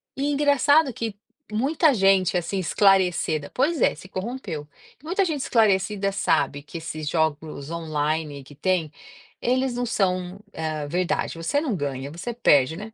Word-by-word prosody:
e 280 +2 -1
engraçado 285 0 +4
que 225 -3 -4 0.4
muita 285 +6 +3
gente, 195 -2 +3
assim, 185 +3 -2
esclarecida 180 -5 +2
Pois 295 +5 +1
é, - - +3
se 185 - -12
corrompeu. 185 - -5 0.4
Muita 370 +4 +1
gente 300 -5 -2
esclarecida 200 -3 +2
sabe 170 -6 +1
que 150 +3 -9
esses 155 -2 -5
jogos 155 -2 -2
online 155 -3 -2
que 145 - -15
tem, 175 -3 0 0.5
eles 255 +1 +1
não 245 0 -2
são, 185 -3 -1 0.2
hã, 155 -2 -3
verdade, 175 +1 -1
você 170 +13 0
não 275 -9 -1
ganha, 140 -2 -4
você 190 +9 -5
perde, 150 - +3
né? 215 +2 -8
185 Hz, 150 wpm, -24 LUFS, 155-240 Hz, 0.5 s, engraçado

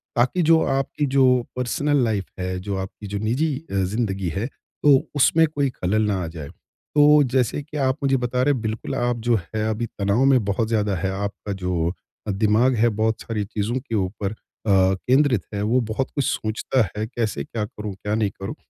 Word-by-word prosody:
ताकि 125 +9 +2
जो 165 0 +5
आपकी 135 +2 0
जो 135 0 +3 0.3
पर्सनल 140 +4 0
लाइफ़ 105 -4 0 0.2
है, 90 0 -2
जो 100 +2 -4
आपकी 95 +2 -6
जो 100 +1 -3
निजी 130 +9 0 0.2
अ, - - -5 0.2
जिंदगी 100 -5 -1
है, 100 +7 -2 0.4
तो 145 -2 +7 0.2
उसमें 160 +3 +5
कोई 145 -3 0
खलल 110 -3 -1
ना 100 -3 0
आ - - -3
जाए। 80 -3 -7 0.5
तो 150 0 +7
जैसे 130 +2 +1
की 150 +1 -8
आप 130 -1 +1
मुझे 135 -1 +3
बता 125 0 -1
रहे 145 +2 +3
हैं 125 - -3
बिल्कुल 110 0 -3
आप 120 0 0
जो 120 - +4
हैं 105 +4 -4
अभी 110 +2 -1
तनाव 100 +5 +2
में 130 -4 +4
बहुत 105 +3 0
ज़्यादा 105 -3 0
है, 95 +2 -2
आपका 100 +1 -4
जो 85 -2 0 0.4
अ, - - +1
दिमाग 110 +6 +3
है 120 +1 +3
बहुत 110 +1 0
सारी 110 -3 -3
चीज़ों 105 +3 -2
के 120 -3 -5
ऊपर 100 0 -2
अ, - - -8 0.3
केंद्रित 100 +6 +3
है। 100 - -2
वो 115 +5 +2
बहुत 130 +5 -2
कुछ 140 - +1
सोचता 110 +4 0 0.2
है 105 - -1
कैसे 110 - -2
क्या 105 +8 -4
करूँ, 105 -1 -7
क्या 105 +2 -3
नहीं 110 -2 +1
करूँ? 100 +9 -4
110 Hz, 200 wpm, -23 LUFS, 100-130 Hz, 0.5 s, तो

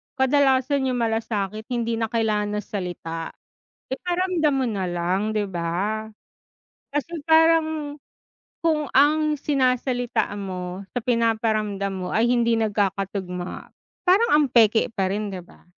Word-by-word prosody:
Kadalasan 265 0 +2
yung 255 - 0
malasakit 220 -1 -2
hindi 235 -2 -1
na 225 - 0
kailangan 210 -2 0
ng 210 - -2
salita, 170 -4 -5 0.6
iparamdam 350 -1 0
mo 265 - +1
na 195 -6 -2
lang, 185 +5 -1
'di 210 - +1
ba? 190 +6 -2 0.8
Kasi 295 +3 -3
parang, 315 -2 +2 0.6
kung 310 -4 0
ang 300 +1 +3
sinasalita 255 -3 0
mo 185 -1 -5
sa 245 - -2
pinaparamdam 220 -4 0
mo 185 -1 -4
ay 230 +2 +2
hindi 235 -2 +2
nagkakatugma, 195 -3 -2 0.3
parang 390 +6 +4
ang 300 -1 +5
peke 225 -1 +4
pa 195 -4 0
rin, 205 +1 -2
'di 185 - -5
ba? - - -20
225 Hz, 125 wpm, -23 LUFS, 200-280 Hz, 0.8 s, ang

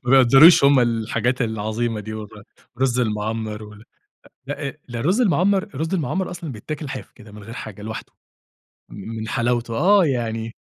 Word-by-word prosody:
ما 120 - -1
بيقدّروش 135 +5 +7
هم 140 -1 +6
الحاجات 120 +2 0
العظيمة 110 0 -2
دي 110 +1 -7
والله 105 -2 -9 0.3
الرز 130 -1 +1
المَعمّر 110 -1 -2
وال 105 0 -12 0.6
لأ 145 0 -5
ده 120 -1 -4
رز 190 - +2
المَعمّر، 195 -1 +2
الرز 165 -4 -4
المَعمّر 185 +2 -1
أصلًا 175 -4 -6
بيتاكل 145 +6 -6
حاف - - -7
كده، 110 -4 -16
من 105 0 -11
غير 115 +3 -9
حاجة 105 -4 -8
لوحده، 110 +1 -7 0.8
م - - -11 0.2
من 110 - -5
حلاوته. 120 -1 -1
آه 190 +3 +5
يعني 115 -4 -2
120 Hz, 165 wpm, -22 LUFS, 110-145 Hz, 0.8 s, بيقدّروش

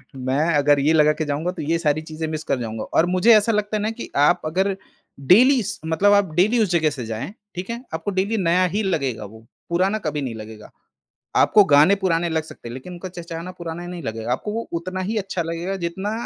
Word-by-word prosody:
मैं 135 +6 0
अगर 145 0 +4
ये 150 +3 +3
लगा 150 -1 +5
के 155 - -3
जाऊँगा 150 +4 -2
तो 185 - -7
ये 165 +3 0
सारी 155 -2 +1
चीज़ें 160 0 -5
मिस 155 0 -4
कर 135 -4 -1
जाऊँगा 110 -2 -4
और 165 - +1
मुझे 185 +6 +4
ऐसा 215 +2 +2
लगता 210 0 -1
है - - -3
ना 215 - 0
कि 230 +1 -8
आप 145 +1 +4
अगर 190 +5 0 0.4
डेली 240 - +5
इस 210 -1 -4
मतलब 165 +6 +3
आप 200 -5 +2
डेली 210 +7 +3
उस 205 - -1
जगह 160 -3 +3
से 135 -5 -6
जाएँ, 110 - -5 0.2
ठीक 180 +3 -6
है? 235 +2 -5
आपको 165 +5 -3
डेली 200 +4 0
नया 180 -1 +2
ही 215 +2 0
लगेगा 135 - -2
वो, 110 +2 -13 0.2
पुराना 185 +5 +1
कभी 150 -5 -3
नहीं 125 -4 -4
लगेगा। 110 0 -10 0.6
आपको 210 - +6
गाने 150 +6 +5
पुराने 175 -3 0
लग 160 -1 -1
सकते 135 -6 -11
हैं - - -7
लेकिन 130 +8 -8
उनका 180 +2 -7
चहचहाना 170 0 -7
पुराना 170 -1 -7
ही - - -7
नहीं 175 -2 -7
लगेगा, 110 +1 -4
आपको 170 +11 -2
वो 230 +1 -4
उतना 185 +2 -5
ही 220 +1 -2
अच्छा 195 -3 -2
लगेगा 170 +4 -3
जितना 190 +5 -3
170 Hz, 235 wpm, -22 LUFS, 145-195 Hz, 0.6 s, आपको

